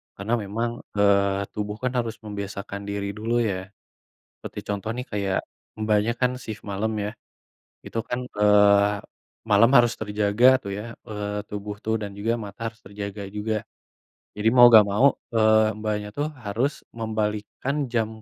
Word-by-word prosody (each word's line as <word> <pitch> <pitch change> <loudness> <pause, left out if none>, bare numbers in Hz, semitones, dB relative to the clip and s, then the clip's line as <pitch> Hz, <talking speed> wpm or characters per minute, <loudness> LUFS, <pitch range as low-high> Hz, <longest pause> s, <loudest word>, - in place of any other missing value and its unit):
Karena 100 +4 -3
memang, 115 +4 -2 0.3
eee, 100 -1 +3
tubuh 105 0 -4
kan 125 - +1
harus 115 -2 -1
membiasakan 100 -1 -5
diri 100 0 -2
dulu 115 +2 -2 0.2
ya. 95 - -1 0.8
Seperti - - -7
contoh 105 +1 -3
nih, 125 0 -4
kayak 100 -2 0 0.4
Mbaknya, 110 +1 +2
kan 125 0 +3
shift 110 -3 -8
malem 100 +3 -1 0.2
ya, - - -2 0.8
itu 115 - -3
kan, 125 - -1 0.2
eee, 105 0 +5 0.5
malam 105 +3 +6
harus 120 -1 +5
terjaga 105 +2 +1 0.2
tuh 100 - -6
ya, 105 - -5 0.3
eee, 105 0 -4
tubuh 105 0 -5
tuh 110 0 +1
dan 100 -1 -4
juga 110 +3 0
mata 100 -1 -11
harus 110 0 -24
terjaga 100 0 -6
juga. 110 +1 -1 0.8
Jadi 105 +1 0
mau 120 -1 +10
nggak 110 -2 +9
mau, 120 +8 +5 0.3
eee, 110 -1 +5
Mbaknya 105 -1 -2
tuh, 145 +1 0 0.2
harus 115 +8 0 0.3
membalikkan 110 +4 -2 0.2
jam 115 -2 +2
105 Hz, 150 wpm, -25 LUFS, 100-110 Hz, 0.8 s, mau